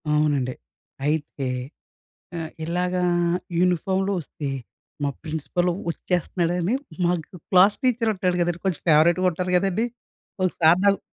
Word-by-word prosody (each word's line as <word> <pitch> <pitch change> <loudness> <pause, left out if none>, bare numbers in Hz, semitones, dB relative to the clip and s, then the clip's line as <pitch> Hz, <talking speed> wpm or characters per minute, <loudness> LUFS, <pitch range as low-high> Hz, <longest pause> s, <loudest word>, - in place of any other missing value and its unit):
అవునండి. 145 -4 +1 0.5
అయితే 150 -3 -1 0.9
ఆహ్, 160 -1 -5
ఇలాగా 180 +2 0 0.6
యూనిఫామ్‌లో 185 +2 +1
వస్తే, 150 -1 -6 0.6
మా 145 - +2
ప్రిన్సిపల్ 160 +3 -1 0.2
వచ్చేస్తన్నాడని, 175 +3 0 0.3
మాకు 175 0 -1
క్లాసు 190 +2 +6
టీచరు 240 -3 +2
ఉంటాడు 180 -2 0
కదండీ! 175 0 0
కొంచెం 185 -5 0
ఫేవరెట్‌గా 170 +4 +5
ఉంటారు 180 +2 -3
కదండీ! 195 +4 +1 0.6
ఒకసార్ 170 -1 +4
నాకు 200 0 +5
175 Hz, 110 wpm, -24 LUFS, 160-185 Hz, 0.9 s, క్లాసు